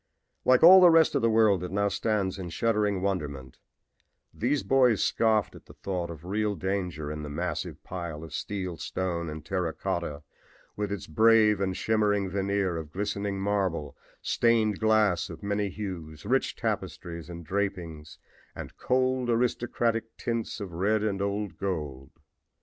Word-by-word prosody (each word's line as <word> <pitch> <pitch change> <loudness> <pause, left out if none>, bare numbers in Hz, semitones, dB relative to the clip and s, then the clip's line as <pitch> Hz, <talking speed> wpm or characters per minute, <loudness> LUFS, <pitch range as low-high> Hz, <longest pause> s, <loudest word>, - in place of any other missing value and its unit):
Like 130 +2 +5
all 185 +3 +10
the 180 - +9
rest 165 -1 +5
of - - +1
the 115 - +3
world 110 -4 +4
that 90 - -4
now 100 +1 +1
stands 100 -1 -1
in 90 -2 -5
shuddering 105 -1 0
wonderment, 75 -9 -3 0.7
these 135 +5 0
boys 125 -5 +3
scoffed 110 -3 +2
at - - -15
the - - -14
thought 90 -3 -3
of 85 0 -9
real 105 +2 -1
danger 90 -6 -3
in 75 0 -5
the 75 - -6
massive 85 +5 -4
pile 85 -4 -6
of 80 -2 -10
steel, 95 -2 -4
stone 85 +1 -3
and 75 -1 -8
terra 90 -2 -1
cotta, 85 -6 -3 0.5
with 105 -1 -3
its 100 -4 -4
brave 110 +3 +4
and 95 -1 -1
shimmering 105 -3 +1
veneer 100 -2 0
of 80 -2 -7
glistening 100 +1 -3
marble, 95 -7 -1 0.3
stained 110 -3 +2
glass 110 -4 +2
of 80 +2 -10
many 100 0 -1
hues, 90 -6 -7
rich 130 +5 +1
tapestries 85 -1 -4
and 85 -1 -8
drapings, 85 -5 -3 0.4
and - - -8
cold, 130 -1 +1
aristocratic 115 -1 0
tints 115 -1 -3
of 100 -4 -6
red 105 +5 +1
and 100 -2 -1
old 100 0 -3
gold. 75 -9 -4
100 Hz, 155 wpm, -28 LUFS, 85-110 Hz, 0.7 s, all